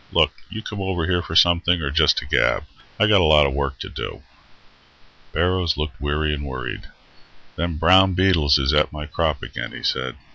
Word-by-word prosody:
"Look, - - +3 0.2
you 110 +1 -7
come 105 -2 -6
over 95 -4 -2
here 90 0 0
for 80 -1 -7
something, 85 +1 +4
or 70 -3 -3
just 75 0 +3
to - - -2
gab? - - +1 0.4
I 105 - +4
got 105 -3 +4
a - - +3
lot 75 -1 +5
of 70 - -1
work 70 -1 -3
to - - -5
do." - - -7 1.1
Barrows 90 -3 0
looked 75 -3 -5
weary 75 +1 -1
and 75 -1 -5
worried. 65 -3 -6 0.7
"Them 85 -2 -3
brown 95 +4 +5
beetles 85 -7 +3
is 70 +1 0
at 75 +1 +2
my 75 0 -7
crop 80 -2 -2
again," - - -7
he - - -9
said. 65 -1 -2
80 Hz, 195 wpm, -21 LUFS, 75-90 Hz, 1.1 s, lot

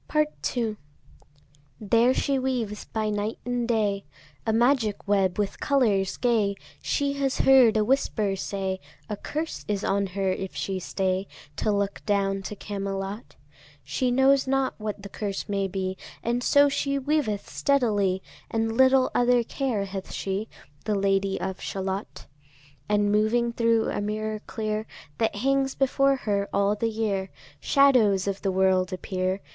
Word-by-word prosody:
Part 305 -3 -1
II. 220 -3 -1 1.0
There 230 +4 +3
she 275 -1 +1
weaves 240 -5 -2
by 215 -1 -2
night 210 +1 -2
and 245 -1 -1
day 210 -4 +1 0.4
A - - +3
magic 230 -3 +2
web 195 -3 +2
with 205 -1 -2
colours 215 -9 +2
gay. 220 -5 +2 0.3
She 280 -1 0
has 270 -1 +1
heard 250 -5 +6
a 215 - +2
whisper 215 -5 +1
say, 190 -1 -3 0.3
A 210 - -2
curse 310 +9 -4
is 205 -2 -1
on 200 0 +1
her 190 0 -1
if 190 0 -4
she 190 -1 -2
stay 190 +1 -1 0.3
To 215 - +1
look 200 -1 -1
down 195 -1 +1
to 210 - -6
Camelot. 195 +1 -5 0.5
She 145 - -1
knows 265 +2 +4
not 270 0 +1
what 210 -1 -5
the - - -6
curse 200 0 -4
may 195 -1 0
be, 190 0 -3 0.3
And 240 +1 0
so 285 +2 +5
she 280 0 0
weaveth 275 -7 -1
steadily, 205 -9 +1 0.3
And 225 0 -1
little 260 +1 +5
other 245 0 +3
care 235 -5 -2
hath 195 -1 -6
she, 195 +3 -3 0.4
The 215 - +1
Lady 195 0 +1
of 190 0 -4
Shalott. 195 +1 -4 0.6
And 205 0 +2
moving 230 +3 +2
thro' 230 -1 +2
a - - -2
mirror 215 +1 -2
clear 215 -1 -3 0.3
That 225 -2 +1
hangs 270 +4 +1
before 275 +1 +3
her 200 -5 -1
all 200 +1 +2
the 225 +2 -1
year, 205 -4 -1 0.3
Shadows 235 -9 +4
of 200 0 -2
the 195 - 0
world 185 0 +2
appear. 185 +1 -2
210 Hz, 150 wpm, -26 LUFS, 195-245 Hz, 1.0 s, heard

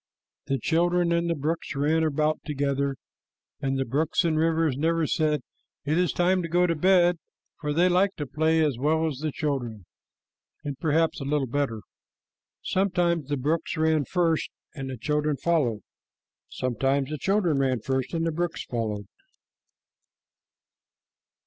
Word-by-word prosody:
The 135 - +1
children 170 +5 +1
and 170 0 +1
the 170 - +1
brooks 155 +2 -3
ran 150 +3 +2
about 155 0 +1
together, 140 -2 -1 0.6
and 135 -1 -1
the 135 - 0
brooks 150 +8 +1
and 160 -2 +2
rivers 160 -2 +2
never 165 +3 +1
said, 150 -1 +1 0.4
"It 150 +2 +1
is 180 0 +2
time 185 +1 +2
to 170 - -3
go 175 +2 +3
to 170 - +1
bed," 175 0 +4 0.4
for 150 -2 -2
they 170 +5 +3
liked 185 +2 +2
to 145 - -3
play 160 +3 +2
as 135 -6 -1
well 160 +4 +2
as 145 -5 -3
the 155 0 -2
children, 125 - -3 0.8
and 145 -2 -4
perhaps 160 -1 +1
a - - -2
little 140 0 0
better. 125 -4 -2 0.8
Sometimes 175 -5 +1
the 145 - 0
brooks 155 +5 -1
ran 155 -2 +2
first 170 -2 +1 0.2
and 135 -2 -6
the 130 - -5
children 150 +3 0
followed. 135 -9 +1 0.7
Sometimes 135 +3 -1
the 155 - -3
children 185 -6 +1
ran 130 -3 +1
first 130 +2 -2
and 165 0 0
the 165 - +1
brooks 170 +2 -3
followed. 110 -4 -3
155 Hz, 155 wpm, -26 LUFS, 135-165 Hz, 0.8 s, bed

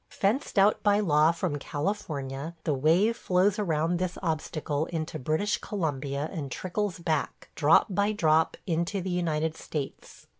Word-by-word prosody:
Fenced 210 +6 -1
out 200 +2 +4
by 205 0 +3
law 155 -5 +4
from 165 -3 -2
California, 145 -2 -4
the 155 - +1
wave 165 - +3
flows 190 0 +2
around 165 -2 0
this 180 -1 -2
obstacle 155 -2 -2
into 160 -2 -4
British 155 +10 0
Columbia 145 -6 -2
and 145 -7 -5
trickles 185 +5 -2
back, 160 -4 -2
drop 155 +1 +5
by 200 +1 +1
drop, 160 -6 +2
into 170 +3 -1
the 185 0 -3
United 160 -3 0
States. 145 -4 -6
165 Hz, 145 wpm, -28 LUFS, 150-195 Hz, -, drop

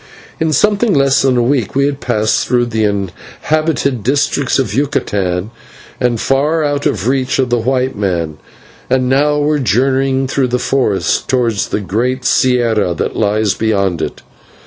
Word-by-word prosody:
In 160 -1 0
something 210 - +2
less 135 -1 +3
than 130 -2 +2
a 120 - +2
week 125 -4 0
we 140 0 +3
had 140 -1 -2
passed 110 -5 0
through 120 -1 +2
the 110 -2 -1
inhabited 130 - -2
districts 140 +2 0
of 130 -6 -1
Yucatan 100 -8 -1 0.5
and 120 -2 0
far 150 +6 +1
out 145 -1 0
of 105 +1 -2
reach 130 0 0
of 130 -2 0
the 120 - +2
white 130 +2 0
man, 85 -6 -2 0.5
and 130 0 +1
now 145 +3 +2
were 150 0 +1
journeying 135 +1 +1
through 135 0 0
the 125 0 0
forest 125 -6 0
towards 120 -5 0
the - - -2
great 120 +7 -2
/sierra/ 115 -8 +1
that - - -2
lies 105 -1 +1
beyond 100 -5 0
it. - - -5
125 Hz, 160 wpm, -15 LUFS, 110-140 Hz, 0.5 s, less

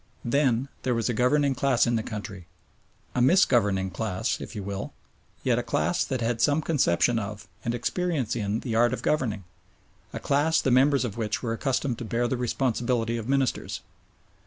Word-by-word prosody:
Then 130 0 +2
there 125 -2 0
was 115 -1 0
a - - +1
governing 135 +5 +2
class 125 -2 +2
in 120 - +1
the 110 - +1
country 105 -5 -7 0.7
a 125 - 0
"misgoverning" 105 - +3
class, 110 +3 -2
if - - -8
you 105 - -4
will, 100 0 -5 0.5
yet - - +2
a - - 0
class - - 0
that 130 -2 -3
had 115 0 -1
some 150 +2 +3
conception 120 - +2
of, 105 0 -6 0.2
and 120 0 -1
experience 155 - -1
in 105 -1 -1
the 120 - -4
art 120 +2 +3
of - - -4
governing; 115 -9 0 0.7
a - - -5
class 150 +4 +2
the 135 - +1
members 135 +1 +4
of 110 -2 -5
which 110 0 -2
were 115 -2 -1
accustomed 125 0 -1
to 120 - -5
bear 120 +3 0
the 130 - -1
responsibility 120 -1 0
of 115 +1 -5
Ministers. 135 -2 0
120 Hz, 185 wpm, -26 LUFS, 110-130 Hz, 0.7 s, members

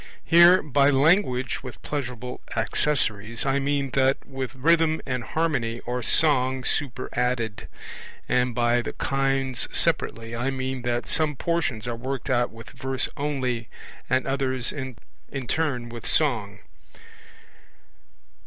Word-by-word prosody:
Here 170 +2 +7
by 140 -1 +3
'language 135 - +2
with 130 -2 -9
pleasurable 125 -3 -5
accessories' 115 -2 0
I 135 0 +2
mean 140 -1 -1
that 135 +1 +3
with 135 -1 -5
rhythm 160 +3 +3
and 125 -2 -2
harmony 135 -9 -1
or 125 +1 -3
song 130 -1 +3
superadded; 125 -4 -2 0.6
and 125 -1 +1
by 120 0 +2
'the - - -5
kinds 135 -2 0
separately' 115 0 0
I 120 +3 -1
mean 130 -1 -3
that 120 0 -1
some 155 -2 +1
portions 135 -8 -1
are 120 - -2
worked 130 +2 -4
out 120 -1 +2
with 115 -1 -12
verse 130 0 -3
only, 130 -6 -2 0.4
and 130 - +2
others 130 -2 0
in 130 -3 -5 0.5
turn 140 -6 -1
with 120 -1 -7
song. 105 -9 +1
130 Hz, 125 wpm, -25 LUFS, 120-140 Hz, 0.6 s, Here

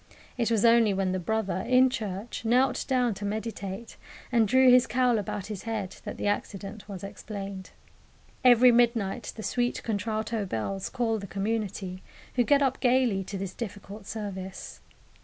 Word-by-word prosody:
It 235 -3 0
was 225 -1 +2
only 230 -3 +5
when 190 -1 0
the 185 - -1
brother, 205 +1 -1
in 255 +6 +4
church, 215 -2 -4
knelt 250 +3 +2
down 250 -4 +2
to 200 - -8
meditate 210 0 -5 0.3
and 230 -3 +4
drew 260 +3 +6
his 250 0 +6
cowl 250 -3 +2
about 200 -1 -4
his 210 -3 -6
head 215 -5 -4
that - - -5
the - - -4
accident 205 +1 -3
was 195 -2 -7
explained. 195 -1 -7 0.7
Every 250 0 +7
midnight 235 -2 +1
the 220 - -7
sweet 245 +2 -1
contralto 220 0 -2
bells 185 - -3
call 230 -3 0
the 200 - -7
community, 195 -2 -3 0.3
who 250 - +2
get 280 +3 +4
up 265 -1 0
gaily 245 -6 +2
to 200 - -5
this 190 -1 -5
difficult 205 -2 -8
service. 190 -3 -6
220 Hz, 160 wpm, -28 LUFS, 195-240 Hz, 0.7 s, Every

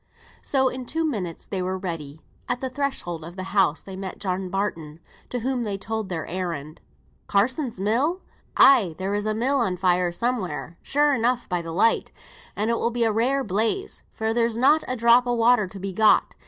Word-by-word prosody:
So 265 -2 +2
in 255 -1 -4
two 325 +4 0
minutes 190 - -3
they 190 - -3
were 185 +1 -2
ready. 160 -5 -6 0.3
At 245 0 0
the 260 0 -4
threshold 255 - -3
of 170 +2 -9
the 185 - -5
house 190 -6 +2
they 190 - -8
met 190 -1 -6
John 185 -1 -3
Barton, 165 -5 -3 0.3
to 245 - -3
whom 255 0 -1
they 205 -3 -2
told 220 0 -4
their 165 -3 -3
errand. 165 -4 -5 0.5
"Carsons' 240 +3 0
mill! 260 - +1 0.4
Ay, 205 -12 +6
there 190 +1 -2
is 205 +1 -1
a 215 - 0
mill 265 +5 +1
on 190 -7 0
fire 180 -1 +2
somewhere, 185 -7 -3
sure 290 +1 +2
enough, 245 0 0
by 180 -1 -1
the 165 -1 -7
light, 205 +7 +2 0.4
and 215 +3 0
it 230 - 0
will 235 - +1
be 235 0 0
a 225 - +3
rare 255 +6 +1
blaze, 225 - -1
for 220 0 -2
there's 230 -1 +1
not 295 +6 +4
a 255 - -1
drop 235 +1 +5
o' 245 - +1
water 230 -3 +4
to 195 +2 -10
be 195 0 -4
got. 215 +3 +4
215 Hz, 200 wpm, -24 LUFS, 185-245 Hz, 0.5 s, Ay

